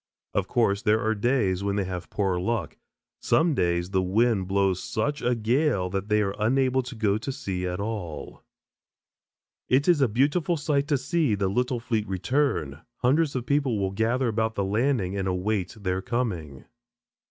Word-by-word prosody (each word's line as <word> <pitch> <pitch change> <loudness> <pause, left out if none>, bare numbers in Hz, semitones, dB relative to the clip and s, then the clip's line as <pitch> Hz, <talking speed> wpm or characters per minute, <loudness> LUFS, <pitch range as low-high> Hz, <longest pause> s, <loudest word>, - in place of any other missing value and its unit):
Of 100 -2 0
course, 100 -2 +1
there 110 -1 +3
are 110 0 +1
days 105 -4 +1
when 100 0 0
they 100 - +1
have 90 -1 -6
poorer 95 -3 0
luck. 115 +3 -2 0.4
Some 165 0 +2
days 85 -4 0
the 95 -1 +2
wind 100 +1 +1
blows 95 -1 +1
such 145 +4 -2
a 125 0 +1
gale 115 - +1
that 100 +2 -3
they 105 0 +3
are 100 -1 -2
unable 130 +4 +2
to 125 0 -8
go 105 -2 +1
to 135 - -4
sea 90 -7 -3
at 90 +1 -3
all. 95 -10 -5 1.3
It 135 +3 +3
is 170 -5 +4
a 135 - +5
beautiful 145 - +1
sight 145 -1 0
to 145 -2 +2
see 145 - +1
the 100 -1 0
little 125 +4 0
fleet 115 -2 -2
return. 95 - -1 0.2
Hundreds 145 +4 +2
of 125 -2 -2
people 140 -5 +1
will 95 -1 -1
gather 115 +6 0
about 110 0 0
the 100 - 0
landing 105 -2 0
and 95 -1 -2
await 95 +1 -1
their 95 -2 -1
coming. 90 - -3
110 Hz, 175 wpm, -26 LUFS, 95-130 Hz, 1.3 s, a